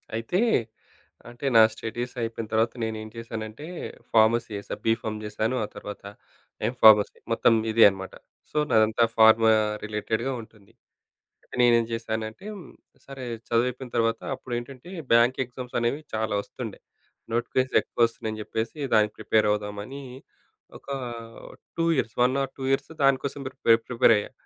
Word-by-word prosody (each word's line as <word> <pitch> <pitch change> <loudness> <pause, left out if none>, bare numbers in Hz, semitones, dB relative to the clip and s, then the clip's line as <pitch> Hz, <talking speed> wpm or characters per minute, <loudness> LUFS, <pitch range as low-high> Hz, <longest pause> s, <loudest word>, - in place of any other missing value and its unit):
అయితే, 115 +11 -1 0.9
అంటే 120 +4 -9
నా 115 - +9
స్టడీస్ 120 +2 -5
అయిపోయిన 115 -1 -4
తర్వాత 110 +1 +2
నేను 110 -1 -2
ఏం 110 - -9
చేశానంటే, 115 +3 -7 0.5
ఫార్మసీ 115 +1 +4
జేశా. 100 - -5
బీఫార్మ్ 110 -1 0
జేశాను. 110 +3 -2
ఆ - - -9
తర్వాత 105 - -8 0.6
ఎమ్ 120 - -3
ఫార్మసీ 105 -2 +7 0.2
మొత్తం 115 - +4 0.2
ఇదే 115 +1 +6
అనమాట. 95 -1 -8 0.4
సో, - - -5
నాదంతా 110 +1 +4
ఫార్మా 110 0 +7 0.3
రిలేటెడ్‌గా 110 +4 -2
ఉంటుంది. 110 -2 -18 0.7
అంటే - - -12
నేనేం 120 -1 +5
జేశానంటే, 110 - -4
హ్మ్. 190 - -11 0.4
సరే 135 -2 -8 0.2
చదువు 115 +1 +2
అయ్యిపోయిన 125 0 -6
తర్వాత, 115 0 +1 0.2
అప్పుడేంటంటే, 125 +5 -7 0.2
బ్యాంక్ 120 +2 +5
ఎగ్జామ్స్ 125 0 -6
అనేవి 120 +6 0
చాలా 110 -1 -1
ఒస్తుండే. - - -8 0.5
నోటిఫికేషన్స్ 130 +2 +1
ఎక్కువ 120 - +2
ఒస్తున్నాయని 110 -1 -6
జెప్పేసి, 110 +5 -4 0.2
దానికి 105 -1 +4
ప్రిపేర్ 110 -1 +2
అవుదామని, 105 +6 -4 0.7
ఒక - - -24 0.9
2 165 - +1
ఇయర్స్, 115 -5 -1
1 125 +2 +2
ఆర్ 135 -1 -3
2 135 - -6
ఇయర్స్ 135 - 0
దానికోసం 135 +1 +1
పె - - -3
ప్రిపేర్ 115 -3 +4
ప్రిపేర్ 120 -1 +5
అయ్యా 105 - -4
115 Hz, 140 wpm, -26 LUFS, 110-125 Hz, 0.9 s, నా